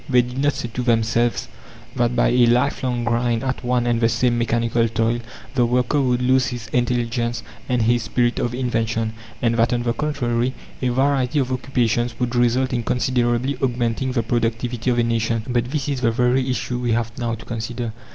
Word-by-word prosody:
They 125 -2 +5
did 125 +2 -6
not 145 +1 +2
say - - -4
to 125 - -2
themselves 115 0 +1 0.5
that 120 -1 +1
by 120 - +3
a 120 -1 +4
lifelong 125 0 +1
grind 115 0 0
at 130 -1 -2
one 125 -1 +1
and 120 -1 +1
the 115 - +4
same 120 +1 +1
mechanical 115 0 +1
toil 115 +1 0 0.3
the 125 -3 +2
worker 125 +4 +2
would 125 -1 +1
lose 130 0 +3
his 120 -2 -5
intelligence 120 -1 -1 0.3
and 125 -2 +2
his 120 +2 +2
spirit 120 +1 0
of 120 0 -1
invention, 115 -3 -1 0.3
and 115 -1 +3
that, 115 +1 +3
on 120 0 0
the 120 -1 0
contrary, 130 -4 -1 0.3
a 130 - +1
variety 135 +1 +1
of 130 -2 +1
occupations 120 -2 0
would 125 -1 -1
result 125 +2 +2
in 120 - 0
considerably 125 +2 0
augmenting 125 0 0
the 120 -3 +1
productivity 115 +1 -1
of 120 - +1
a 120 - +3
nation. 115 -1 0
But 120 -2 0
this 145 0 -2
is 140 -3 -2
the 115 - +3
very 125 +3 +1
issue 125 -1 -2
we 120 -2 0
have 115 0 -1
now 115 -1 -1
to 115 - -12
consider. 115 0 -4
120 Hz, 195 wpm, -21 LUFS, 115-125 Hz, 0.5 s, They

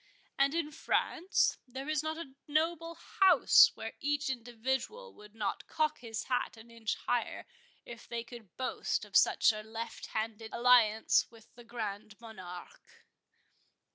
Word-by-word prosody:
And 275 +3 +2
in 320 -3 -1
France, 335 +4 +1
there 265 +3 -7
is 310 -2 +1
not 315 0 -3
a 275 -5 -8
noble 330 +2 0
house, 370 - +6
where 225 - -6
each 290 -1 0
individual 265 - -4
would 210 +1 -16
not 210 -3 -3
cock 310 -1 0
his 225 -2 -5
hat 250 -2 -2
an 225 +1 -14
inch 230 -2 -3
higher, 245 -1 -2 0.4
if 235 0 -10
they 235 -1 -4
could 235 -5 -13
boast 260 - -2
of - - -14
such - - +5
a 215 - -5
left 225 +2 -7
handed 220 0 -4
alliance 235 -3 +4
with 230 -2 -19
the 240 - -14
Grand 215 -2 -6
Monarque." 185 -6 -11
240 Hz, 145 wpm, -32 LUFS, 220-295 Hz, 0.4 s, house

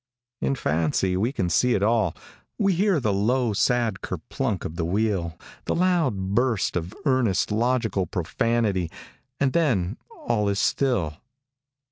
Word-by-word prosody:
In 135 - +1
fancy 85 - 0
we 110 +7 +1
can 95 -10 -1
see 120 +9 +3
it 100 - 0
all. 110 -6 +2 0.4
We 195 -1 +2
hear 190 -1 +2
the 110 -6 0
low, 115 +3 +1
sad 115 -1 +1
kerplunk 95 +4 -3
of 80 - -5
the 85 - -2
wheel, 90 -2 -1 0.3
the - - 0
loud 145 - +1
burst 120 -3 +1
of 90 +3 -3
earnest, 125 -9 +2
logical 110 -4 +1
profanity, 95 +2 0 0.5
and 135 -2 +2
then 115 - +1
all 105 -4 -1
is 100 - 0
still. 100 - +1
105 Hz, 140 wpm, -25 LUFS, 95-125 Hz, 0.5 s, see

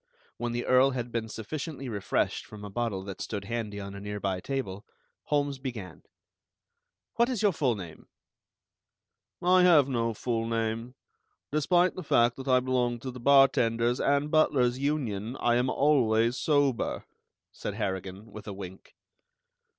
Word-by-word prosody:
When 120 - -2
the 120 +1 -2
Earl 130 +1 +5
had 125 -2 -4
been 115 -1 -3
sufficiently 135 +5 -5
refreshed 100 -5 -1
from 105 -1 -10
a 100 - -8
bottle 105 -3 -2
that 95 -1 -7
stood 100 -2 -4
handy 110 -2 -4
on 100 0 -7
a 100 - -7
nearby 100 -2 -3
table, 100 -5 -4 0.4
Holmes 145 -2 0
began: 120 -8 -7 1.2
"What 235 +1 +4
is 240 -5 -2
your 205 - +5
full 130 -8 0
name?" 85 -6 -10 1.4
"I 180 +1 +5
have 165 -7 +6
no 115 -4 -1
full 115 0 -2
name. 115 +2 -2 0.6
Despite 175 +5 +3
the 185 - -6
fact 120 -7 +3
that 135 0 -8
I 130 -1 +5
belong 125 -2 0
to 130 - -5
the 125 - -9
Bartenders' 120 -3 +4
and 140 +1 +1
Butlers' 130 -5 +3
Union, 130 -6 -2
I 120 - +2
am 125 +1 +1
always 120 -5 +3
sober," 145 -4 +1 0.5
said - - -5
Harrigan, 95 +2 -4
with 105 +1 -10
a 100 - -4
wink. 95 -1 -10
120 Hz, 150 wpm, -28 LUFS, 110-140 Hz, 1.4 s, have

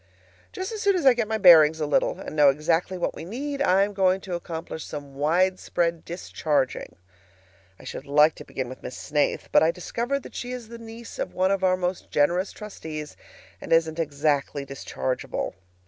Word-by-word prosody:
Just 375 +3 -5
as 435 -2 -5
soon 400 -3 +3
as 345 -6 -1
I 265 - +8
get 235 -3 -1
my 220 0 -1
bearings 160 -5 +7
a 155 - 0
little, 145 - +1
and - - -7
know 145 -2 +6
exactly 165 +6 0
what 175 - -1
we - - -8
need, 275 - -4
I 195 -6 +4
am 205 +1 -2
going 190 -1 +2
to 185 - -6
accomplish 165 -2 -5
some 145 -2 -8
widespread 170 +2 0
discharging. 155 -5 -2 0.8
I - - -14
should 140 - -7
like 150 +2 +5
to - - -8
begin 130 -2 -5
with 130 - -9
Miss - - -7
Snaith; 150 -1 -1
but - - +6
I 160 - +4
discover 235 +10 -2
that - - -12
she 245 0 -5
is 240 -3 -7
the 235 0 -9
niece 230 0 -10
of - - -4
one 185 +1 +2
of 195 -1 0
our 185 0 +3
most 180 0 -3
generous 175 +6 +2
trustees, 155 -8 -8 0.5
and - - -8
isn't 165 0 +3
exactly 145 -2 0
dischargeable. 135 -1 -4
175 Hz, 195 wpm, -25 LUFS, 150-210 Hz, 0.8 s, I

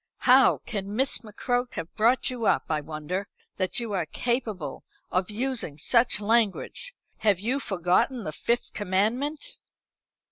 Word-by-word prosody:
How 260 +1 +7
can 200 -1 -4
Miss 265 +3 +3
McCroke 245 +3 -2
have 165 - -5
brought 235 +4 +2
you 235 -4 -2
up, - - +3
I 155 -1 +1
wonder, 160 +6 -4 0.3
that 185 +3 -1
you 230 -3 -4
are 175 -5 -1
capable 220 - -2 0.3
of 185 +2 0
using 230 - -1
such 235 - +3
language? 230 - 0 0.2
Have 205 -4 +2
you 245 +7 0
forgotten 195 +4 +1
the 155 - -4
Fifth 235 +9 -1
Commandment?" 220 +10 -1
215 Hz, 140 wpm, -27 LUFS, 185-245 Hz, 0.3 s, How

